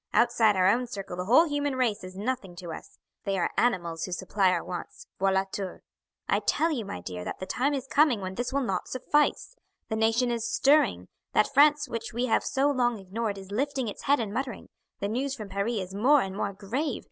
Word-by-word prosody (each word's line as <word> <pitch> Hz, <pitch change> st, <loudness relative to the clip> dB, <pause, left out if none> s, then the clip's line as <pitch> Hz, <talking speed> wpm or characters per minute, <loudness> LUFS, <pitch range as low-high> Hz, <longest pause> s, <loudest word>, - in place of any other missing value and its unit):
"Outside 230 Hz, -3 st, +4 dB
our 185 Hz, 0 st, +4 dB
own 240 Hz, +5 st, +2 dB
circle 195 Hz, -5 st, -6 dB
the 180 Hz, 0 st, -4 dB
whole 255 Hz, -, +6 dB
human 290 Hz, -2 st, -1 dB
race 230 Hz, -6 st, 0 dB
is 185 Hz, 0 st, -9 dB
nothing 205 Hz, -4 st, -3 dB
to 175 Hz, -2 st, -7 dB
us; -, -, -11 dB, 0.3 s
they 195 Hz, -1 st, -1 dB
are 175 Hz, -, 0 dB
animals 170 Hz, -8 st, 0 dB
who 185 Hz, -, -8 dB
supply 190 Hz, +2 st, +1 dB
our 180 Hz, -2 st, 0 dB
wants, 175 Hz, -1 st, -7 dB
voila 190 Hz, 0 st, +3 dB
tour. 195 Hz, -3 st, -5 dB, 0.4 s
I -, -, +2 dB
tell 330 Hz, +1 st, +1 dB
you, 240 Hz, -8 st, -2 dB
my 90 Hz, -, -6 dB
dear, 90 Hz, 0 st, -6 dB
that -, -, -5 dB
the 185 Hz, -, -5 dB
time 275 Hz, +9 st, 0 dB
is 265 Hz, -2 st, -4 dB
coming 280 Hz, -4 st, +3 dB
when 185 Hz, -1 st, -5 dB
this 240 Hz, +5 st, -3 dB
will 280 Hz, 0 st, 0 dB
not 190 Hz, -6 st, -2 dB
suffice. 295 Hz, -, 0 dB, 0.3 s
The 220 Hz, -, -1 dB
nation 225 Hz, +3 st, +2 dB
is 230 Hz, -1 st, -2 dB
stirring; 265 Hz, -, +3 dB, 0.3 s
that 215 Hz, -, +2 dB
France 295 Hz, +1 st, +5 dB
which 230 Hz, -1 st, -5 dB
we 240 Hz, +2 st, 0 dB
have 225 Hz, -, +2 dB
so 280 Hz, +1 st, +1 dB
long 245 Hz, -4 st, +1 dB
ignored 205 Hz, +2 st, -3 dB
is 195 Hz, 0 st, -10 dB
lifting 265 Hz, +2 st, -1 dB
its 205 Hz, -, -6 dB
head 285 Hz, +1 st, +4 dB
and 210 Hz, -3 st, -3 dB
muttering; 255 Hz, -3 st, -4 dB, 0.3 s
the 200 Hz, -, 0 dB
news 265 Hz, +6 st, -2 dB
from 215 Hz, -6 st, -8 dB
Paris 200 Hz, +5 st, -1 dB
is 185 Hz, 0 st, -6 dB
more 260 Hz, +8 st, +4 dB
and 190 Hz, 0 st, -4 dB
more 200 Hz, 0 st, -1 dB
grave. 230 Hz, +9 st, -3 dB
225 Hz, 220 wpm, -28 LUFS, 195-260 Hz, 0.4 s, whole